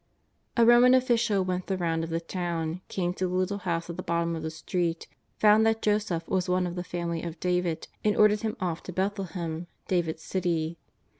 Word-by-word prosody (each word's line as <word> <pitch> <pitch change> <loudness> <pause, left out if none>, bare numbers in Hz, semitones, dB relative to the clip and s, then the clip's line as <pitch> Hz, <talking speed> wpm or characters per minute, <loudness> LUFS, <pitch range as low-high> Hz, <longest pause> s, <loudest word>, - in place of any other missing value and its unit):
A 235 - +6
Roman 240 +2 +7
official 235 -6 +2
went 185 0 -2
the 190 - -1
round 165 -2 0
of 165 - -4
the 165 0 -1
town, 170 -1 -3
came 180 -2 -1
to 185 0 -1
the 180 - -3
little 185 +2 0
house 170 -3 -2
at 170 - -6
the - - -3
bottom 170 0 0
of 160 - -5
the 160 - -3
street, 165 +1 -2 0.3
found 215 +1 +6
that 225 0 +1
Joseph 205 -6 0
was 185 -1 0
one 180 0 +2
of 175 - -3
the 180 0 -4
family 170 -2 -3
of 165 -1 -6
David, 180 -2 -1 0.2
and 210 -1 +2
ordered 210 0 +5
him 220 -1 -2
off 175 -3 -2
to - - -7
Bethlehem, 180 -3 -3 0.2
David's 165 -3 -1
city. 170 -3 -1
180 Hz, 205 wpm, -28 LUFS, 170-200 Hz, 0.3 s, Roman